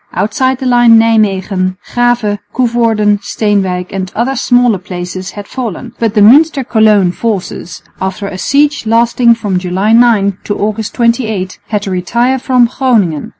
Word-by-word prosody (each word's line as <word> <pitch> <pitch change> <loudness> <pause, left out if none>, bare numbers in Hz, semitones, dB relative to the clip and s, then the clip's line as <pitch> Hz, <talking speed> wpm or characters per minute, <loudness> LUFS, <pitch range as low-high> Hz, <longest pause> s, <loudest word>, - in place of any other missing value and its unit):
Outside 260 +5 -1
the 260 - -6
line 240 -2 +5
Nijmwegen, 195 -4 0 0.2
Grave, 240 -4 0 0.2
Coevorden, 230 -4 +1
Steenwijk 195 -4 -2
and 190 -1 -4
other 255 +4 -1
smaller 245 -4 +2
places 180 +1 -7
had 205 0 -9
fallen; 235 -9 -6
but 225 -2 -1
the 210 - +3
Münster 275 +4 +4
Cologne 215 -5 +3
forces, 190 -4 -5 0.2
after 190 +2 -3
a 185 - -7
siege 285 -1 0
lasting 235 +1 +3
from 205 -5 -2
July 185 +4 -1
9 220 -5 +3
to 205 - -3
August 215 +1 -3
28, 225 -6 -1
had 210 -2 -2
to 195 - -4
retire 235 +8 0
from 250 -1 +2
Groningen. 225 - 0
215 Hz, 150 wpm, -12 LUFS, 195-240 Hz, 0.2 s, line